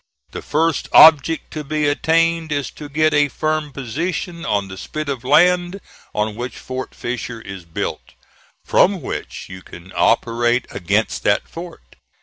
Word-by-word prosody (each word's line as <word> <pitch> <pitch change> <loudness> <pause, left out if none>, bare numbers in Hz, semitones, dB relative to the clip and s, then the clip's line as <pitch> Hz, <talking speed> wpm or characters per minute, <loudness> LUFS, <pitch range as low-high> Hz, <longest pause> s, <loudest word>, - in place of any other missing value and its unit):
The - - -6
first 160 0 0
object 160 0 +6
to 155 - -5
be 150 +1 -1
attained 165 +2 +1
is 145 -2 -2
to 150 -1 -10
get 155 +1 +2
a 145 0 +4
firm 155 +1 -2
position 170 - -4
on 100 -1 0
the 95 - -8
spit 155 +10 -5
of 135 -4 -3
land 175 +6 +3 0.4
on 105 0 -1
which 120 +2 -6
Fort 130 0 -6
Fisher 120 -1 -5
is 95 -5 -9
built, 80 - -5 0.5
from 190 -2 +3
which - - -6
you 95 0 -10
can 90 +1 -13
operate 120 +1 +2
against 100 +3 -1
that 100 - +2
fort. 170 0 -11
145 Hz, 150 wpm, -20 LUFS, 115-160 Hz, 0.5 s, object